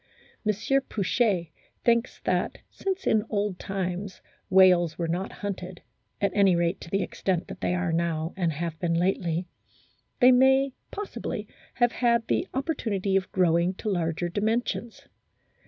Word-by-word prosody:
M. 215 - +3 0.4
Pouchet 200 -4 +1 0.2
* - - -39
thinks 235 +1 +2
that, - - 0
since 385 0 -3
in 215 -1 +3
old 205 -3 -1
times 190 0 -4 0.3
whales 180 -4 +5
were 170 - -1
not 180 +4 -2
hunted, 185 -3 -6 0.4
at 200 - +1
any 195 -3 +4
rate 170 +2 0
to - - -9
the 195 +2 +1
extent 185 -3 -2
that - - -9
they 180 - +1
are 180 -2 -1
now 165 -1 -1
and 175 -3 0
have 160 +1 -4
been 170 -2 0
lately, 175 -1 0 0.7
they 250 0 +8
may 265 +1 +4 0.2
possibly 410 0 -5 0.3
have 240 -1 +3
had 235 -2 +2
the 365 - +1
opportunity 220 - -1
of 190 0 0
growing 175 -1 +2
to 215 - -4
larger 175 -2 -1
dimensions. 220 +4 -2
190 Hz, 150 wpm, -27 LUFS, 175-225 Hz, 0.7 s, they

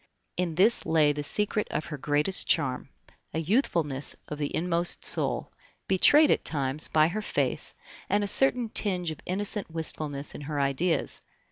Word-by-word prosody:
In 175 -3 -2
this 210 +7 +3
lay 155 -2 +2
the 145 - -4
secret 210 +7 0
of 155 - -3
her - - -4
greatest 150 +7 +1
charm, 135 -7 0 0.5
a - - 0
youthfulness 165 - 0
of 150 - -7
the 145 - -1
inmost 175 +1 0
soul, - - +2 0.4
betrayed 290 - +5
at - - +1
times 140 0 -1
by 155 0 +3
her 215 +5 -3
face, - - -1 0.3
and 205 0 +1
a - - -2
certain 250 +1 +2
tinge 180 -6 -1
of 155 - -8
innocent 200 +1 -2
wistfulness 155 -3 -2
in - - -9
her 145 0 -4
ideas. 140 +5 -1
165 Hz, 160 wpm, -27 LUFS, 150-200 Hz, 0.5 s, betrayed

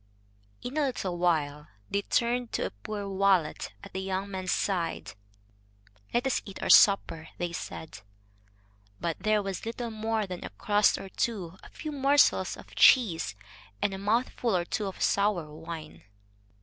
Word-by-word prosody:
In 255 +5 -5
a 300 - +3
little 185 -9 -3
while 150 -4 0 0.2
they 200 - +1
turned 240 +3 0
to - - 0
a - - -3
poor 200 - -6
wallet 195 -4 +1
at - - -11
the 190 - -3
young 190 +1 -3
man's 185 -1 -3
side. 180 -4 -1 1.0
"Let 240 +2 +1
us 265 - +1
eat 195 - -9
our - - +3
supper," 165 -5 +5
they 175 -1 -2
said. 160 -1 -7 1.0
But 170 -2 -2
there 210 +1 +2
was 195 -1 -4
little 235 +1 -4
more 220 0 -1
than 180 -2 -7
a - - -5
crust 210 -2 +2
or 195 - -8
two, 190 -4 -3
a - - -13
few 310 - -6
morsels 280 0 +3
of - - -14
cheese, 165 - +5 0.4
and 200 - 0
a 190 - -5
mouthful 230 +1 0
or 175 - -1
two 205 +3 -2
of 190 - -4
sour 200 -7 +1
wine. 160 0 -8
195 Hz, 160 wpm, -29 LUFS, 175-225 Hz, 1.0 s, supper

